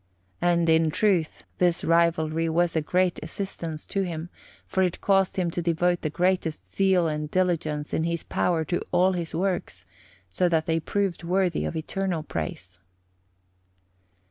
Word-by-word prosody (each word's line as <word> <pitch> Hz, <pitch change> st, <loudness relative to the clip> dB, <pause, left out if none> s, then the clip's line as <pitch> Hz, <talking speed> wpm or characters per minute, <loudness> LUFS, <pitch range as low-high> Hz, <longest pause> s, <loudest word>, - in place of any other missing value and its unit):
And, 170 Hz, -1 st, +2 dB
in 160 Hz, 0 st, +4 dB
truth, 180 Hz, -2 st, +1 dB, 0.2 s
this 175 Hz, -1 st, +3 dB
rivalry 165 Hz, -1 st, +2 dB
was 170 Hz, +1 st, +1 dB
a 160 Hz, -, +2 dB
great 180 Hz, +3 st, +1 dB
assistance 165 Hz, -5 st, -5 dB
to 195 Hz, -, -1 dB
him, 170 Hz, -2 st, -4 dB, 0.3 s
for 190 Hz, -, -1 dB
it 180 Hz, -2 st, 0 dB
caused 195 Hz, -2 st, +2 dB
him 175 Hz, -2 st, 0 dB
to 175 Hz, -, -2 dB
devote 175 Hz, +1 st, +1 dB
the 155 Hz, -, -1 dB
greatest 175 Hz, -1 st, 0 dB
zeal 190 Hz, -3 st, +2 dB
and 150 Hz, -1 st, -3 dB
diligence 160 Hz, -5 st, 0 dB
in 160 Hz, -, +1 dB
his 170 Hz, -1 st, -1 dB
power 165 Hz, -3 st, 0 dB
to 175 Hz, -, -1 dB
all 180 Hz, +1 st, +4 dB
his 170 Hz, -3 st, -3 dB
works, 185 Hz, +1 st, -2 dB, 0.4 s
so 175 Hz, -, +1 dB
that 160 Hz, -2 st, +1 dB
they 165 Hz, -1 st, +1 dB
proved 195 Hz, +2 st, -2 dB
worthy 180 Hz, -1 st, +1 dB
of -, -, -3 dB
eternal 175 Hz, +1 st, -2 dB
praise. 90 Hz, -, -5 dB
170 Hz, 155 wpm, -26 LUFS, 160-180 Hz, 0.4 s, in